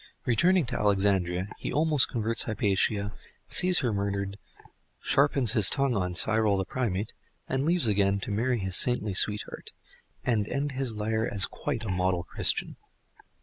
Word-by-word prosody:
Returning 170 +8 +2
to - - -4
Alexandria, 95 -2 +1
he - - -4
almost 150 -2 +3
converts 115 0 0
Hypatia, 100 -1 -1 0.3
sees 180 -3 +3
her 120 -5 -1
murdered, 100 0 -3 0.6
sharpens 135 -5 +1
his 110 -6 +5
tongue 135 -2 0
on 90 -3 -2
Cyril 110 +1 +2
the 95 - -2
primate, 105 -2 -3 0.3
and 135 +1 -1
leaves 170 -5 +2
again 100 -1 +1
to - - -4
marry 120 +5 0
his 95 -3 -2
saintly 110 -4 +2
sweetheart, 105 +2 0 0.5
and 110 -4 0
end 140 +4 -2
his 130 -4 -3
lire 110 +1 -2
as 100 -3 0
quite - - -5
a - - -4
model 90 -1 -1
Christian. - - -1
105 Hz, 150 wpm, -27 LUFS, 100-125 Hz, 0.6 s, his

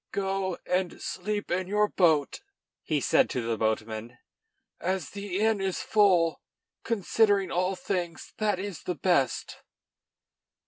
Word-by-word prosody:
"Go 195 -2 -1
and 180 -1 -1
sleep 205 +2 -3
in 180 +1 0
your 210 +2 +2
boat," 160 - +2 0.4
he 155 -2 0
said - - +3
to 125 - -2
the 115 0 -1
boatmen, 110 +2 -2 0.6
"as 185 -2 -2
the 200 -2 -4
inn 220 -1 +2
is 190 -1 -1
full. 180 -6 +3 0.4
Considering 205 -3 +2
all 185 +2 0
things, 185 -8 -4
that 210 -3 +1
is 195 -1 -5
best." 175 -5 0
185 Hz, 125 wpm, -28 LUFS, 165-200 Hz, 0.6 s, said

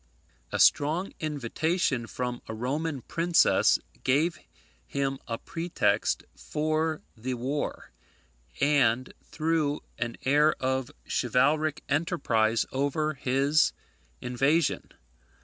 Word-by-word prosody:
A - - -1
strong 160 +7 +3
invitation 150 -2 -1
from 125 0 -4
a 110 - -5
Roman 140 +4 -2
princess 170 0 +3 0.3
gave 145 +4 +2 0.5
him 135 -1 -2
a 115 -1 -2
pretext 170 +6 0
for 155 +1 -1
the 125 +3 -3
war, 135 +5 -3 0.7
and 130 -4 +2
threw 155 -1 -1 0.2
an 120 -1 -3
air 150 +3 +4
of 130 -1 -1 0.2
chivalric 150 +4 +1
enterprise 135 -8 +1
over 145 +3 0
his 135 +3 +2 0.5
invasion. 135 +7 +1
145 Hz, 95 wpm, -28 LUFS, 125-155 Hz, 0.7 s, air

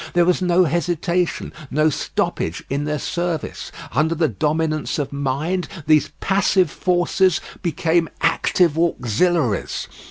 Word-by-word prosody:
There 175 0 +4
was 180 +1 +2
no 180 0 +4
hesitation, 175 +2 -1 0.2
no 155 +2 +2
stoppage 85 - -2
in 140 +2 -1
their 150 0 -1
service; 170 +1 -3 0.2
under 155 +6 +1
the 160 0 +2
dominance 155 +6 -1
of 145 -2 -3
mind 145 +6 -1 0.2
these 155 -1 +4
passive 190 -3 +2
forces 180 0 +2 0.2
became 165 0 +1
active 165 -1 +2
auxiliaries. 145 - 0
165 Hz, 120 wpm, -21 LUFS, 150-175 Hz, 0.2 s, There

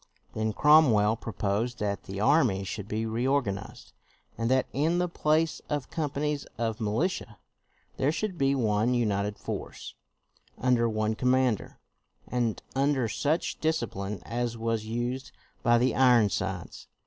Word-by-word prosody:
Then 110 0 -1
Cromwell 115 -6 +5
proposed 115 +2 -2
that 100 -2 -3
the 95 0 -6
army 115 -5 +3
should 100 +1 -5
be 110 +1 -2
reorganized, 120 -2 -2 0.4
and 115 0 -1
that 130 0 +3
in 160 +5 +1
the 180 0 +1
place 160 -1 +1
of 145 -3 -3
companies 150 -1 -2
of 115 -1 -2
rnilitia 115 - -1 0.6
there 135 +3 +2
should 195 +3 -3
be 140 -3 +2
one 110 0 +1
united 105 -3 0
force, - - -6 0.6
under 120 -2 +2
one 110 0 0
com 125 +3 0
mander, 130 -4 +1 0.5
and 120 -3 -1
under 135 -3 +2
such 150 +9 -1
discipline 105 -11 -2
as 120 0 -2
was 115 -1 -1
used 120 +3 -3 0.3
by 120 0 +4
the 125 +1 +2
Ironsides. 120 -5 +1
120 Hz, 135 wpm, -28 LUFS, 110-140 Hz, 0.6 s, Cromwell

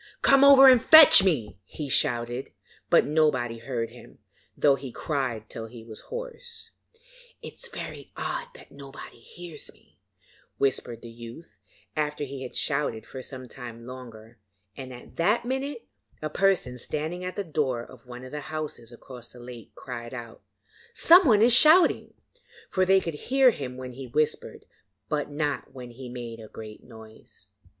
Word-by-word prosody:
'Come 275 0 +6
over 275 -1 +9
and 255 -3 +7
fetch 315 -9 +9
me,' 145 - -1
he 145 +9 -7
shouted, 120 0 0 0.4
but - - +5
nobody 135 -7 +1
heard 115 -1 -4
him, 120 - -15 0.4
though 145 - +4
he 135 -2 -5
cried 125 -7 -3
till 110 +1 -7
he 115 0 -12
was 110 -2 -8
hoarse. 485 -1 -8 0.7
'It - - -8
is 485 - -7
very 480 - -8
odd - - -3
that - - -15
nobody 140 -3 -11
hears 165 +5 -10
me,' - - -28 0.6
whispered 125 -4 -1
the 115 - -9
youth 120 +7 -12 0.4
after 150 -1 -2
he 135 -1 -7
had 130 - -8
shouted 140 -7 -1
for 130 - -9
some 130 0 -8
time 120 -2 -10
longer; 120 -3 -11 0.4
and 130 -1 -8
at 125 -1 -13
that 210 +8 +2
minute 270 - -4 0.3
a 155 -1 -5
person 185 -10 +1
standing 160 +7 -4
at 185 0 -5
the 200 - -2
door 140 -8 -2
of 125 0 -16
one 125 0 -9
of 130 - -10
the 150 - -5
houses 155 -7 -6
across 120 0 -10
the 125 - -14
lake 120 -1 -11
cried 120 -1 -8
out: 115 -2 -9 0.5
'Someone 305 - +6
is 240 +1 +5
shouting'; 315 +7 +5 0.6
for 185 -1 +1
they 190 0 +5
could 165 -3 -5 0.2
hear 265 -1 +5
him 130 - -7
when 130 -1 -7
he 130 +1 -9
whispered, 150 +5 -2 0.4
but 150 -1 -2
not 145 -2 -3
when 125 -2 -9
he 125 +1 -10
made 120 -2 -7
a 110 - -10
great 110 0 -11
noise. 110 -2 -14
135 Hz, 165 wpm, -26 LUFS, 120-175 Hz, 0.7 s, over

